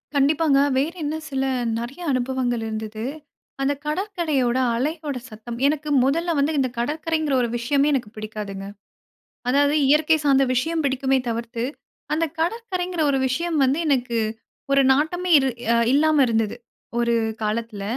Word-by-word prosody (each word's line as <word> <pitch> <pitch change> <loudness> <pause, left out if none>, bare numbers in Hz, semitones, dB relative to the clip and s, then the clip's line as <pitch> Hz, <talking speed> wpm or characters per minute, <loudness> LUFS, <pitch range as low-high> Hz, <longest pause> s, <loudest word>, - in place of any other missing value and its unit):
கண்டிப்பாங்க. 285 +1 +3 0.2
வேறு 285 +5 +1
என்ன 295 +1 -2
சில, 270 -1 -1 0.4
நிறையா 270 +9 -6
அனுபவங்கள் 250 -2 -1
இருந்துது. 220 0 -5 0.6
அந்த 275 +1 +2
கடற்கரையோட 305 - 0 0.2
அலையோட 295 +2 -2
சத்தம், 225 +2 -8
எனக்கு 300 +1 -1
முதல்ல 335 +6 +1
வந்து, 290 +3 +1
இந்த 260 -1 +1
கடற்கரைங்கிற 310 +4 -1
ஒரு 240 - 0
விஷயமே 275 +4 +1
எனக்கு 250 -6 -1
பிடிக்காதுங்க. 210 -2 -6 0.8
அதாவது 285 +3 +3
இயற்கை 310 +2 +4
சார்ந்த 275 -1 +4
விஷயம் 320 +6 0
பிடிக்குமே 265 0 +1
தவிர்த்து, 230 0 -3 0.5
அந்த 325 +2 +1
கடற்கரைங்கிற 365 -2 -2
ஒரு 270 - +1
விஷயம் 330 +5 -1
வந்து 270 +4 +1
எனக்கு, 250 -4 +1 0.5
1 275 0 +5
நாட்டமே 350 +6 0
இரு 265 -1 +1 0.2
அ - - +3 0.2
இல்லாம 310 +2 +4
இருந்துது. 225 -2 0 0.4
1 235 0 +2 0.3
காலத்தில. 215 -1 -3
275 Hz, 135 wpm, -23 LUFS, 240-310 Hz, 0.8 s, 1